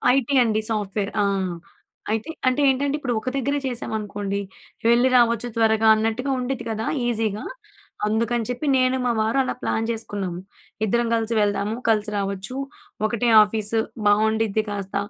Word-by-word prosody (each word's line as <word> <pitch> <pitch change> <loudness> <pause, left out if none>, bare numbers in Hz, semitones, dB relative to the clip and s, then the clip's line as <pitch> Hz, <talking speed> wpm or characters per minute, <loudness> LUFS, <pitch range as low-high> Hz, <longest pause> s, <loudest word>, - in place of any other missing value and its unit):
IT 275 +1 +1
అండి. 220 -2 +1
Software 205 -1 -2
ఆ! - - +2 0.9
అయితే 225 +7 -2 0.2
అంటే 255 +2 +2
ఏంటంటే, 280 +2 +1
ఇప్పుడు 250 -4 -2
ఒక 255 - -3
దగ్గరే 280 +2 0
చేశామనుకోండి 205 -4 -3 0.5
వెళ్ళి, 240 +2 +5
రావచ్చు 235 0 +3
త్వరగా 220 -1 +3
అన్నట్టుగా 225 +5 -1
ఉండిద్ది 250 0 -3
కదా! 220 +1 -3 0.2
ఈజీగా. 220 -3 -1 0.6
అందుకని 230 +2 0
చెప్పి 250 +5 -3
నేను, 255 0 +2
మా 240 - +2
వారు 220 +4 0
అలా 255 - -2
ప్లాన్ 225 - 0
చేసుకున్నాము. 200 -6 -4 0.5
ఇద్దరం 235 +3 +1
కలిసి 225 0 -1
వెళ్దాము. 205 +1 0
కలిసి 215 -1 +1
రావచ్చు. 195 +4 -3 0.5
ఒకటే 235 +1 0
ఆఫీస్ 210 0 -3 0.3
బావుండిద్ది. 220 0 +2
కాస్త 200 -1 -5
225 Hz, 140 wpm, -23 LUFS, 210-240 Hz, 0.9 s, వెళ్ళి